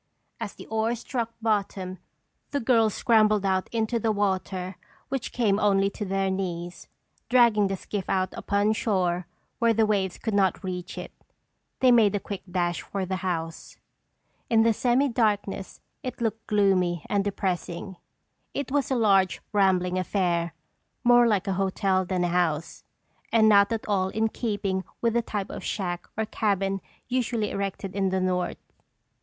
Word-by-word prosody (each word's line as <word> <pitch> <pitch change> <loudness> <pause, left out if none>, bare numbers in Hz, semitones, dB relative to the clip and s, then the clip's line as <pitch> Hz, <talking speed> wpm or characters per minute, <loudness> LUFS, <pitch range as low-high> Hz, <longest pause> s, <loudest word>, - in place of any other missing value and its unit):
As - - -5
the - - -11
oars 225 +1 -1
struck 235 -4 -3
bottom, 195 -4 -1 0.5
the 285 - -1
girls 225 -4 +3
scrambled 215 -4 +3
out 190 -1 0
into 230 0 0
the 225 0 +1
water 190 -2 -1 0.3
which 270 -2 -3
came 215 -4 +2
only 195 -1 +3
to 210 - -5
their 195 0 0
knees, 175 -2 -4 0.4
dragging 235 -5 +5
the 195 0 -2
skiff 195 0 -5
out 185 -1 0
upon 205 +1 +1
shore 180 -5 0 0.3
where 230 -2 +3
the 220 0 +4
waves 195 -4 0
could 220 - -3
not 195 0 +2
reach 180 -1 -5
it. - - -6 0.7
They 255 -1 +6
made 220 -4 +5
a - - +1
quick 200 -1 -6
dash 175 -1 -1
for 195 -2 -4
the 185 +1 -2
house. 165 -3 -4 0.7
In 225 -1 +5
the 230 0 +4
semi 250 +5 +2
darkness 205 -5 -1 0.2
it 255 - -6
looked 225 -1 -2
gloomy 185 -5 +2
and 200 -1 +1
depressing. 190 -2 -3 0.6
It 280 -2 -3
was 285 -1 +1
a 265 - +1
large, 195 -5 +3
rambling 185 -2 +2
affair, 170 -3 0 0.5
more 240 -1 +6
like 205 -4 +1
a 195 - 0
hotel 190 -1 +1
than 180 -1 -1
a 175 - +1
house, 170 -3 -1 0.5
and 220 -1 +5
not 200 0 +6
at 225 -1 -3
all 190 -3 +1
in 220 +2 0
keeping 205 -5 -2 0.2
with 230 -1 +1
the 235 - +2
type 205 -4 -4
of - - -7
shack 175 -4 -3
or 220 - 0
cabin 195 -2 0 0.3
usually 240 -4 -1
erected 195 -1 -4
in 195 -1 +1
the 190 0 0
North. 185 -1 -1
200 Hz, 160 wpm, -26 LUFS, 185-220 Hz, 0.7 s, They